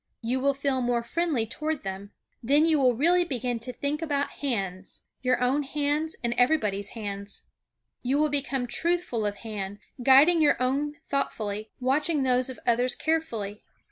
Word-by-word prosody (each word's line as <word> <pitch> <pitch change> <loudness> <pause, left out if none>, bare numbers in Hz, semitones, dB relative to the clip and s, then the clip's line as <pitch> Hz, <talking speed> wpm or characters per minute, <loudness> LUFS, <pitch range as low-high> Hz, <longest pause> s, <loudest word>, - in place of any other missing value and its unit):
You 245 +3 0
will 280 +1 +2
feel 275 -1 0
more 240 -1 0
friendly 295 -2 0
toward 305 +6 -3
them. 195 +1 -5 0.3
Then 285 +6 +4
you 320 -2 +3
will 250 -3 +4
really 345 +8 +4
begin 250 -7 -2
to 250 +3 -5
think 285 +4 -3
about 285 -3 -1
hands; 195 -9 -3 0.2
your 255 -1 +2
own 255 +4 +2
hands 295 +2 -1
and 235 0 +1
everybody's 210 -8 +1
hands. 200 -1 -5 0.6
You 260 +3 +1
will 305 0 +3
become 275 -3 -1
truthful 330 -6 0
of 205 - -3
hand, 205 -2 -4 0.2
guiding 280 +7 +6
your 290 -4 +4
own 280 +4 0
thoughtfully; 215 -6 -2
watching 285 +3 +1
those 255 0 +2
of 260 - -8
others 245 +2 +2
carefully. 230 -11 -2
260 Hz, 160 wpm, -27 LUFS, 230-295 Hz, 0.6 s, guiding